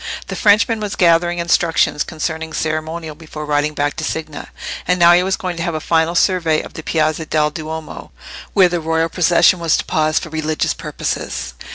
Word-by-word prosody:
The - - -4
Frenchman 220 +1 +3
was 210 -2 -4
gathering 175 0 +3
instructions 170 -3 +1
concerning 160 0 -4
ceremonial 155 +1 -3
before 155 -1 -9
riding 150 0 0
back 145 0 -1
to - - -4
Signa, 155 -2 -5 0.4
and 180 +1 +2
now 170 0 +7
he 175 - +5
was 190 +1 0
going 180 -2 -4
to - - -3
have 170 -1 -2
a - - -1
final 160 +1 +1
survey 165 -4 +2
of - - -11
the - - -7
Piazza 155 0 -1
del 150 -1 +1
Duomo, 155 - -7 0.4
where 190 -2 +6
the 175 0 -2
royal 160 +1 0
procession 175 +1 +3
was 165 -2 +2
to - - -3
pause 155 0 +1
for 160 - -2
religious 155 0 -1
purposes. - - -4
160 Hz, 190 wpm, -18 LUFS, 155-175 Hz, 0.4 s, now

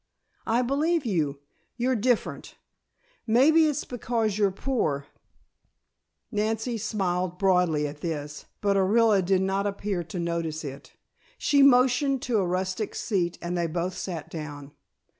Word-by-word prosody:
"I 235 +3 +2
believe 295 +4 +1
you. 150 -9 -1 0.4
You're 255 +1 +1
different. 245 +1 -1 0.7
Maybe 305 +8 +5
it's 295 -1 -2
because 230 -4 -1
you're 205 -1 +3
poor 185 - -1 0.6
" - - -50 0.5
Nancy 220 +2 -1
smiled 185 -4 -1
broadly 180 -6 +2
at 145 +1 -9
this, 150 -3 -5 0.2
but 200 -1 +2
Orilla 205 +1 +4
did 190 +1 +2
not 195 +1 0
appear 200 -2 -2
to 175 - -7
notice 170 -2 -2
it. 140 +2 -9 0.4
She 285 -1 +3
motioned 265 0 +4
to 235 -3 +1
a 185 - 0
rustic 185 +3 -2
seat 180 -6 -1
and 175 +1 -2
they 170 -1 0
both 175 +3 -3
sat 170 -5 -5
down. 145 -3 -7
195 Hz, 140 wpm, -26 LUFS, 170-235 Hz, 0.7 s, Maybe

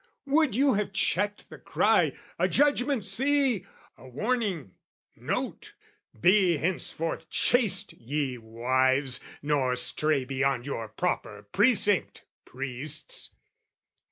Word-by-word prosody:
Would 290 -3 +2
you 275 +2 +3
have 205 -1 -2
checked 205 +1 -1
the - - -10
cry - - +2 0.2
"A - - +3
judgment, 280 -5 +2
see! 265 -7 +1 0.3
"A 130 - -13
warning, 190 - -2 0.4
note! - - -4 0.4
Be 185 - +4
henceforth 165 0 -2
chaste, 205 -6 +1
ye 130 0 -3
wives, 130 +4 +1 0.2
"Nor 140 -4 +1
stray 135 +2 0
beyond 135 -1 -1
your 115 -5 -4
proper 105 -6 -3
precinct, 205 -3 +3 0.2
priests!" 135 +3 -4
155 Hz, 100 wpm, -27 LUFS, 130-210 Hz, 0.4 s, Be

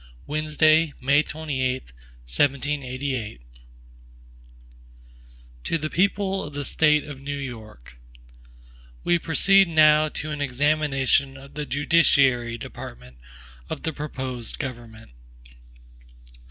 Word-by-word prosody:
Wednesday, 155 +1 +2
May 140 +3 +3
28, 130 - -3 0.3
1788 135 - -1
HAMILTON - - -12 2.2
To 165 - 0
the 155 0 -4
People 195 +1 0
of 145 -1 -9
the 145 -1 -3
State 150 0 +3
of 145 -2 -10
New 140 +1 -4
York: 110 - -9 1.1
WE 175 0 +2
PROCEED 195 +4 +4
now 155 -1 +5
to 155 0 -5
an 150 -1 -4
examination 140 0 +1
of 140 +1 -14
the 150 0 -5
judiciary 135 -5 +3
department 60 - -10 0.5
of - - -5
the 160 - -2
proposed 130 -5 -5
government. 115 - -8
145 Hz, 100 wpm, -24 LUFS, 130-155 Hz, 2.2 s, now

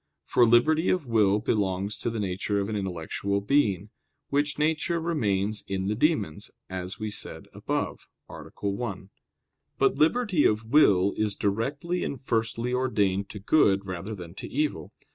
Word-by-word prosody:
For 120 - +4
liberty 155 +9 +4
of 180 -5 +1
will 105 -4 +3
belongs 100 -1 -1
to 120 - -1
the 115 -1 -4
nature 100 +1 -1
of 100 +1 -2
an 110 - -2
intellectual 95 +1 -2
being, 105 -4 +1 0.4
which 145 +1 0
nature 160 +2 0
remains 105 - -1
in 95 0 -2
the - - +1
demons, 135 - 0 0.2
as 95 +1 -5
we 110 -1 -3
said - - -7
above - - -3 0.2
(A. - - -10 0.2
1). 100 -2 -4 0.7
But - - +2
liberty 185 +1 +3
of 110 +1 +2
will 100 -7 +4
is 105 -2 0
directly 140 - -1
and 140 - -4
firstly 115 0 -1
ordained 100 -6 0
to - - -8
good 100 -3 +3
rather 95 +3 -5
than 85 -3 -9
to - - -6
evil. 140 - -2
105 Hz, 155 wpm, -27 LUFS, 100-140 Hz, 0.7 s, For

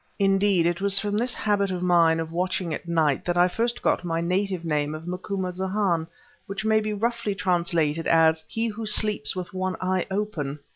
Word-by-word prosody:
Indeed, 195 -3 +3
it 175 +1 0
was 200 0 +2
from 205 0 0
this 240 +3 0
habit 205 -2 +1
of 180 -1 -3
mine 170 -2 +4
of 165 0 -4
watching 180 -1 -1
at 170 - -6
night 160 -4 +1
that 175 0 -1
I 175 0 +5
first 230 +6 -2
got - - +1
my 165 -1 -1
native 180 +1 -1
name 150 -1 -1
of 155 +1 -9
Macumazahn, 185 -1 -2 0.4
which 195 +2 -5
may 220 0 +4
be 215 0 -3
roughly 225 0 -1
translated 170 -4 0
as 160 -1 +4
"he 225 +1 -2
who 220 0 -4
sleeps 210 -8 +1
with 185 +1 -6
one 185 0 -2
eye 185 0 -1
open." 190 -8 -3
185 Hz, 190 wpm, -25 LUFS, 165-205 Hz, 0.4 s, I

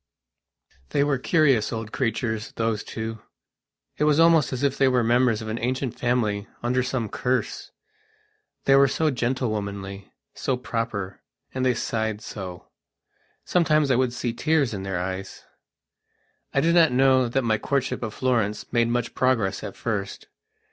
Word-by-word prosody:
They 140 - +2
were 145 -3 +1
curious 140 -7 +3
old 110 -1 -5
creatures, 115 -3 -2
those 115 -2 -1
two. 110 0 -5 0.8
It 150 - +3
was 150 0 +3
almost 165 -2 +5
as 130 +1 -3
if 140 -2 +2
they 135 - +3
were 125 -2 +3
members 120 -1 +2
of - - -7
an 110 +2 -3
ancient 130 +1 -1
family 110 -4 0 0.2
under 125 +2 +1
some 125 -3 -2
cursethey 125 +5 -2 1.0
were 135 0 +7
so 155 +3 +1
gentlewomanly, 105 -6 -3 0.2
so 130 - -1
proper, 115 -6 -4 0.3
and 130 - -2
they 125 -1 +2
sighed 110 -1 -2
so. 95 -5 -8 0.7
Sometimes 155 -5 +2
I - - +4
would 130 0 +2
see 120 -1 -3
tears 150 -5 +1
in 100 - -4
their 95 -2 -3
eyes. 95 +1 -5 1.1
I 140 - +2
do 170 +2 +3
not 165 -4 +5
know 130 -1 +4
that 135 +2 0
my 110 -2 +1
courtship 140 -2 -1
of 110 -3 -4
Florence 115 -5 -1
made 120 -1 +3
much 120 0 -1
progress 115 -7 +1
at - - -6
first. 100 -4 -4
120 Hz, 155 wpm, -24 LUFS, 110-130 Hz, 1.1 s, were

